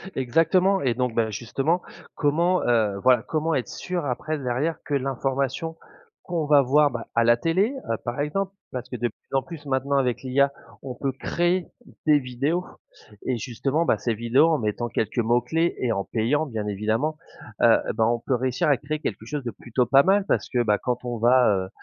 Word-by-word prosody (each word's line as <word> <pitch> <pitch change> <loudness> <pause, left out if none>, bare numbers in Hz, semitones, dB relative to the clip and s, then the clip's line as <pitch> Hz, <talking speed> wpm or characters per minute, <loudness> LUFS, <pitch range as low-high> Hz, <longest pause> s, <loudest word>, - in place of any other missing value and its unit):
Exactement 165 +9 +2
et 130 -3 +1
donc, 125 -1 -2
ben, 110 -1 +1
justement, 135 - -1 0.3
comment, 170 +5 +2
heu, 110 -5 +2
voilà, 125 -3 +5
comment 160 +1 -1
être 130 - -2
sûr 180 -4 -4
après, 150 +4 -2
derrière, 140 +4 -1
que 145 - -5
l'information 135 +3 -1 0.5
qu'on 170 -3 -2
va 145 -1 +6
voir, 145 +3 +3
bah, 120 -1 -6
à 115 - +4
la 120 0 +5
télé, 185 - +1 0.2
heu, 115 - 0
par 120 +3 -3
exemple, 190 +7 -1 0.2
parce 125 -1 -5
que - - -5
de 120 0 0
plus 115 - -10
en - - +2
plus 160 0 -10
maintenant 135 +1 0
avec 125 -3 0
l'IA, 140 +2 +2 0.3
on 130 -2 -6
peut 135 +2 -2
créer 175 +6 -1 0.4
des 150 -2 +5
vidéos 140 +7 -2 0.6
et 130 - 0
justement, 135 +7 -1
bah, 110 - +2
ces 115 +3 -1
vidéos 120 +7 +3
en 160 -3 +2
mettant 110 +2 -2
quelques 110 +2 -2
mots 120 +1 +2
clés 165 +8 0
et 125 - 0
en 100 - -2
payant, 125 +7 0
bien 110 -7 -4
évidemment, 110 +10 -1 0.4
heu, - - +6
eh - - -1
ben, 110 - +2
on 120 +1 +1
peut 130 +2 -1
réussir 125 +2 0
à 140 - +4
créer 150 +4 -4
quelque - - -4
chose 150 -2 -4
de 120 - -2
plutôt 120 +2 -1
pas 135 +4 +5
mal, 195 +1 +3
parce - - 0
que, 125 -2 +1
bah, 105 -2 +2
quand 125 +1 -3
on 120 -1 -3
va, 125 +2 +5 0.2
heu, - - -17
130 Hz, 205 wpm, -24 LUFS, 120-155 Hz, 0.6 s, va